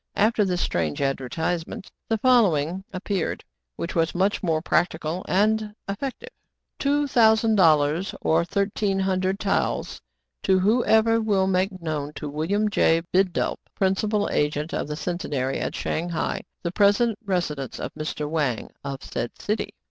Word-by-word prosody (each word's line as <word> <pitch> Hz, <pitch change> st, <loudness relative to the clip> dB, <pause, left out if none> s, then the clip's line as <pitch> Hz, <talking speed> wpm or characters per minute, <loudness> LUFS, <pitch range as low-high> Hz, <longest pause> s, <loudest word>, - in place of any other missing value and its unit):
After 215 Hz, +1 st, +3 dB
this 180 Hz, -2 st, 0 dB
strange 80 Hz, -3 st, -1 dB
advertisement, 160 Hz, +7 st, -2 dB, 0.2 s
the 225 Hz, -, +2 dB
follow 230 Hz, -, +4 dB
ing 165 Hz, +7 st, -3 dB
appeared, 190 Hz, -1 st, -2 dB, 0.3 s
which 170 Hz, -, -4 dB
was 165 Hz, -1 st, 0 dB
much 195 Hz, +3 st, +1 dB
more 165 Hz, -4 st, +1 dB
practical 165 Hz, 0 st, 0 dB
and 210 Hz, +2 st, +1 dB
effective: 245 Hz, +7 st, -5 dB
^ -, -, -47 dB, 0.4 s
" -, -, -54 dB
Two 290 Hz, +1 st, +2 dB
thousand 225 Hz, -4 st, +4 dB
dollars, 160 Hz, -1 st, +3 dB
or 160 Hz, +1 st, +3 dB
thirteen 200 Hz, +2 st, 0 dB
hundred 190 Hz, 0 st, 0 dB
taels, 200 Hz, -, -1 dB, 0.4 s
to 190 Hz, -, +3 dB
who 215 Hz, +6 st, +3 dB
ever 225 Hz, +1 st, +4 dB
will 200 Hz, -3 st, +2 dB
make 190 Hz, 0 st, 0 dB
known 150 Hz, -2 st, -3 dB
to 150 Hz, -, -6 dB
William 165 Hz, +9 st, 0 dB
J. 165 Hz, -5 st, +3 dB
Bidulph, 185 Hz, -1 st, +1 dB, 0.2 s
principal 205 Hz, +2 st, +1 dB
agent 150 Hz, +2 st, 0 dB
of -, -, -2 dB
the 150 Hz, -, -4 dB
Centenary 145 Hz, -6 st, -2 dB
at -, -, -3 dB
Shang 170 Hz, +2 st, -2 dB
hai, 165 Hz, -2 st, -2 dB, 0.2 s
the 170 Hz, -, -1 dB
present 205 Hz, +3 st, +3 dB
residence 170 Hz, -, -2 dB
of -, -, -5 dB
Mr. 155 Hz, -1 st, -4 dB
Wang 145 Hz, -7 st, -1 dB
of 135 Hz, -1 st, -5 dB
said 120 Hz, 0 st, -5 dB
city." 210 Hz, +2 st, -2 dB
185 Hz, 155 wpm, -24 LUFS, 155-205 Hz, 0.4 s, follow